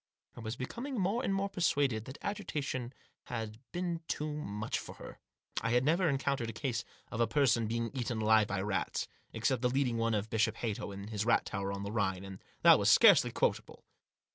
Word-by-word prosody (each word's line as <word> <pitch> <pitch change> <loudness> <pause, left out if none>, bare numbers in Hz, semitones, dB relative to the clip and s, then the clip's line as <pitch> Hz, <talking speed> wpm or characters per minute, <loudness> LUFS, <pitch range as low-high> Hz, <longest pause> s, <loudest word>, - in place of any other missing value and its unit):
I - - -9
was 110 +1 -4
becoming 240 - -5
more 200 +7 +1
and 220 - 0
more 195 0 0
persuaded 140 - +1
that 130 - -8
agitation 145 - -3 0.3
had 110 -1 -5
been 175 -2 -2
too 150 0 -2
much 110 -8 -3
for - - -9
her. - - -11 0.4
I 115 - -1
had 125 +1 +3
never 165 +3 +3
encountered 135 -3 0
a - - -5
case 125 +1 -2 0.3
of 115 - -2
a 115 - +4
person 120 -4 +3
being 115 +1 -2
eaten 120 -3 -2
alive 110 -1 +4
by 95 -1 -2
rats, 95 -3 -1 0.2
except - - 0
the 125 - +2
leading 125 -2 +1
one 115 -1 +1
of 105 +1 -2
Bishop 110 0 +2
Hatto 110 -3 -3
in 100 +1 -7
his 105 -1 -2
rat 115 +1 +3
tower 100 -1 -3
on 100 0 -4
the 100 - -4
Rhine, 95 -3 -1
and 95 -1 -10 0.2
that - - +8
was - - +3
scarcely - - +7
quotable. - - -1
115 Hz, 200 wpm, -32 LUFS, 110-145 Hz, 0.4 s, that